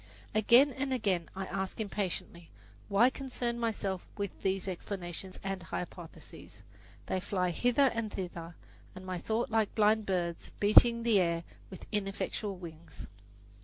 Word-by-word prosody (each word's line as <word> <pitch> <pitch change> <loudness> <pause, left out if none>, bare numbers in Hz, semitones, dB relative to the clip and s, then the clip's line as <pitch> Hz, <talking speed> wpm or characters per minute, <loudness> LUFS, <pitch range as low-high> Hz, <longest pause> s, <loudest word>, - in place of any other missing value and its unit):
Again 235 +6 +6
and 270 +1 -3
again 200 -9 0
I 190 0 -3
ask 190 +2 -4
impatiently, 185 -5 -4 0.4
"Why 220 +6 +5
concern 245 -3 -3
myself 200 -5 -1
with 200 -2 -2
these 190 0 0
explanations 185 0 -4
and 195 -1 -3
hypotheses?" 170 0 -8 0.4
They 190 - -1
fly 180 -1 0
hither 245 - +3
and 230 -2 -2
thither 170 -3 -6 0.4
in 185 0 -9
my 185 -1 -3
thought 225 +5 -1
like 220 -2 +1
blind 215 0 +3
birds 175 -3 -1
beating 235 +3 +6
the 225 -4 +4
air 170 -2 +1 0.3
with 190 - -10
ineffectual 200 0 -2
wings. 170 -2 -10
195 Hz, 135 wpm, -32 LUFS, 180-225 Hz, 0.4 s, Again